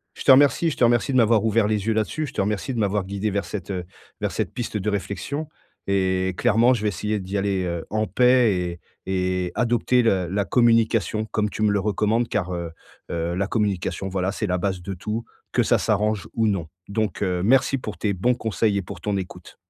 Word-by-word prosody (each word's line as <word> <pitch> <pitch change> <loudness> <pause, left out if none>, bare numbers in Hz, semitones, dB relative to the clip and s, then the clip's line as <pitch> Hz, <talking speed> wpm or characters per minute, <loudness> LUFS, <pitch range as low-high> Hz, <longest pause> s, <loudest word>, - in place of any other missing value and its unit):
Je - - -7
te - - +6
remercie, 145 +5 +5
je - - -5
te - - +1
remercie 120 +3 +3
de 130 - +2
m'avoir 115 -2 +4
ouvert 110 -1 +2
les 105 -1 -1
yeux 110 - +3
là-dessus. 110 +8 -1
Je - - -10
te - - 0
remercie 105 +6 -2
de 115 - -3
m'avoir 100 -2 0
guidé 100 +2 -2
vers 100 -2 -1
cette 95 +1 -6 0.5
vers - - -1
cette - - -3
piste 115 -3 -3
de 105 +1 -1
réflexion 105 +9 -3 0.4
et 95 -1 +1
clairement 120 +4 +4
je 110 - -2
vais - - +1
essayer 105 +3 -2
d'y 95 +2 -4
aller, 95 -1 0
heu, 85 -2 -3
en 110 0 0
paix 125 -3 +4
et 90 -1 -3 0.3
et 90 -1 -1
adopter 120 +1 +2
la 95 -6 +2
la 100 0 0
communication 115 -2 +2
comme 105 -1 -1
tu 110 - -6
me 105 - +4
le 100 - +1
recommandes 110 +3 +1
car, 90 -3 -1
heu 85 -2 -4 0.4
heu, 85 0 -2
la 100 +1 -1
communication 95 -4 -1
voilà, 95 0 -1
c'est 105 0 -3
la 90 0 0
base 95 -1 -2
de 95 +2 -5
tout 105 +6 -4 0.3
que - - +2
ça - - +3
s'arrange 105 -1 0
ou 110 -1 +1
non 95 -6 -1 0.2
donc 105 0 -2
heu, 90 -2 0
merci 135 +4 +3
pour 110 -5 -6
tes 105 -2 0
bons 120 +7 +1
conseils 110 -2 0
et 100 - 0
pour 90 - -9
ton 105 -1 -1
écoute. 95 -1 -8
105 Hz, 220 wpm, -23 LUFS, 95-115 Hz, 0.5 s, te